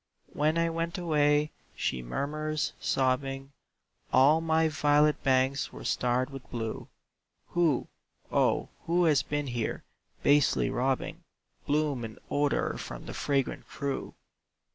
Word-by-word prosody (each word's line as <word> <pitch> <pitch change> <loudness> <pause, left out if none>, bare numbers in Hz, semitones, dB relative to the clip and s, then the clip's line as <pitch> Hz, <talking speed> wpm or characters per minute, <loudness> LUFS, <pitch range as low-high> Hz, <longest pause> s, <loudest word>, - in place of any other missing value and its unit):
"When 155 +2 +1
I 165 0 +3
went 165 +3 -2
away," 150 -3 +2 0.2
she 65 - -1
murmurs, 150 - -2
sobbing, 135 +1 0 0.6
"All 145 +5 +5
my 160 0 +2
violet 150 -1 +3
banks 130 0 +2
were - - -10
starred 125 +2 +1
with 135 -2 -9
blue; 115 -2 -4 0.6
Who, 165 -7 +2 0.4
O, - - +2 0.2
who 175 +2 +3
has 150 -4 +4
been 145 0 -2
here, 120 -4 -3 0.4
basely 145 -1 +4
robbing 130 +1 -1 0.4
Bloom 145 -4 +1
and 110 -1 -7
odor 145 0 +1
from - - -7
the - - -7
fragrant 140 -2 -1
crew? 140 -2 -4
145 Hz, 120 wpm, -29 LUFS, 130-155 Hz, 0.6 s, All